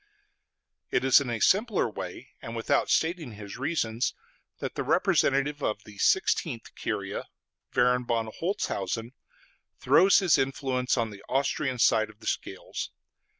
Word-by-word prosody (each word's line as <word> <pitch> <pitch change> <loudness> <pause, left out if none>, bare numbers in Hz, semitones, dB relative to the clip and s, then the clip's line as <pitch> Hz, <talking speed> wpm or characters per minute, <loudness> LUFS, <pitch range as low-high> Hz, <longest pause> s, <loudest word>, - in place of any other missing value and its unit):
It 125 - +1
is 135 +1 +6
in 135 - -4
a 115 -1 -2
simpler 210 - +3
way 110 - -7
and 115 - -7
without 115 - +1
stating 160 -7 0
his 105 +1 -9
reasons 130 -5 -1 0.4
that - - -5
the - - -3
representative 140 +2 +2
of 105 -4 -2
the 105 -2 -14
Sixteenth 140 - +1
Curia, 100 -2 -4 0.5
Baron 125 0 +2
von 115 -1 0
Holzhausen, 120 - -2 0.6
throws 195 +1 +5
his 185 -5 +4
influence 130 -1 0
on 115 -2 0
the 100 -1 -12
Austrian 135 0 0
side 110 -2 +3
of 105 0 -16
the 110 - -14
scales. - - -4
125 Hz, 140 wpm, -28 LUFS, 110-140 Hz, 0.6 s, is